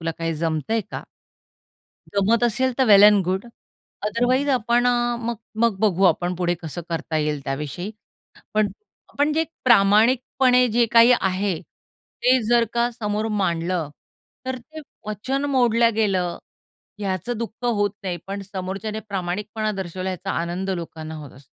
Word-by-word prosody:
तुला 165 0 -2
काही 165 -1 -2
जमतंय 160 +7 -1
का? - - -5 1.1
जमत 220 +4 +2
असेल 255 +3 +1
तर 265 - +4
वेल 200 -2 +8
एंड 205 -1 +7
गुड 190 +3 -1 0.6
अदरवाइज 245 +6 +1
आपण 240 -1 +2
अ, 240 -1 +1
मग 235 0 -3 0.3
मग 210 -5 +1
बघू 195 -3 +2
आपण 180 0 +2
पुढे 175 0 0
कसं 165 +2 -6
करता 165 -1 -3
येईल 150 -1 -1
त्याविषयी," 150 +8 -4 0.6
पण 215 -1 +3 0.5
पण 295 +1 +3
जे 320 +1 +1 0.2
प्रामाणिकपणे 250 +3 +4
जे 235 +2 +2
काही 235 +1 +7
आहे 190 -2 -1
ते 255 +1 -2
जर 240 -1 +4
का 235 +1 +1
समोर 215 -1 -2
मांडलं 170 -3 -1 0.6
तर 260 0 -2
ते 310 +6 -11 0.3
वचन 255 +7 -2
मोडल्या 235 -3 +3
गेलं 195 -5 0 0.6
याचं 200 +4 -3
दुःख 230 +1 -6
होत 205 -4 +1
नाही 185 -3 -2
पण 200 +1 -5
समोरच्याने 195 +2 -5
प्रामाणिकपणा 205 +3 -3
दर्शवला 190 -1 -4
याचा 185 +1 -5
आनंद 180 +3 -3
लोकांना 160 -3 -5
होत 150 -3 -9
असतो. 135 +1 -17
205 Hz, 145 wpm, -23 LUFS, 180-235 Hz, 1.1 s, वेल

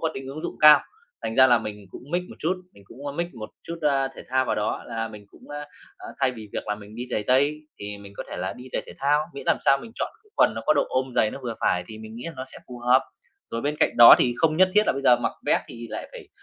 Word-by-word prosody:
có 160 - +1
tính 135 0 -6
ứng 140 +3 -6
dụng 175 - -5
cao, 150 -1 +9 0.4
thành 115 - -3
ra 130 - +8
là 120 -2 +5
mình 105 -2 -7
cũng - - -10
mix 175 +1 0
một - - -11
chút, 175 +4 0 0.2
mình 100 - -18
cũng, 140 +2 -11
ơ, 140 - -3
mix 170 +3 -2
một 110 -3 -8
chút, 170 0 -7
a, 135 -2 +2
thể 135 - -12
thao 130 +1 +2
vào - - 0
đó, 105 - -2
là 115 -1 -3
mình 105 -2 -11
cũng, - - -18
a, 145 - -5 0.4
a, 370 -1 -11
thay 130 - +3
vì 110 -4 -10
việc - - -4
là 105 - -1
mình 105 0 -13
đi 120 +2 -5
giày 110 - -1
tây, 140 +4 +3 0.2
thì 105 0 -6
mình 100 0 -12
có - - -4
thể - - -6
là - - -3
đi 125 - -12
giày - - -1
thể - - -10
thao, 145 +2 +3
miễn 140 -1 -8
làm - - +4
sao 135 - +5
mình 225 +11 -11
chọn - - -3
cái 425 - -28
quần - - +4
nó - - -5
có 155 - +6
độ 145 - +3
ôm 130 0 -1
dày, 110 - +3
nó - - -7
vừa 115 -2 -4
phải 90 0 +1
thì 110 0 -10
mình 110 0 -10
nghĩ 120 - -7
là 170 - -5
nó 130 - -5
sẽ 135 - -12
phù 125 - -8
hợp. 125 +2 +4 0.5
Rồi 115 - -3
bên 145 +4 -2
cạnh - - +2
đó 120 0 +11
thì 120 - +2
không 155 -1 +2
nhất 185 +1 +5
thiết 210 - +6
là - - +3
bây 140 - -5
giờ 125 -3 +6
mặc - - -2
vest - - +3
thì 115 0 -9
lại - - -6
phải 465 -6 -11
130 Hz, 310 wpm, -25 LUFS, 115-145 Hz, 0.5 s, đó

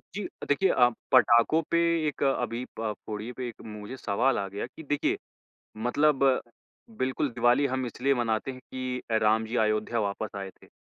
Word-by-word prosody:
जी, 205 - -3 0.2
अ, - - -5
देखिए 165 +7 +3
अ, 125 -1 +5 0.2
पटाखों 120 +8 +5
पे 170 - +4 0.3
एक 145 - -2
अभी 125 -3 0 0.2
प 110 -2 -1
फोड़िये 110 +3 -5
पे 125 -1 -3
एक 115 - -9
मुझे 105 +4 -8
सवाल 120 +5 +1
आ 100 - -2
गया 100 +4 -4
कि 160 +5 -12
देखिये, 145 0 0 0.6
मतलब 135 +5 +2 0.7
बिल्कुल, 130 +2 0
दिवाली 120 +4 +3
हम 130 -1 -2
इसलिए 135 +4 0
मनाते 115 +1 -1
हैं 130 -1 -9
कि 130 0 -5
अ, 110 - +3
राम 110 +1 +3
जी 120 +3 -3
अयोध्या 110 +2 0
वापस 100 +1 -3
आए 95 -1 -5
थे। - - -17
120 Hz, 185 wpm, -28 LUFS, 110-135 Hz, 0.7 s, अ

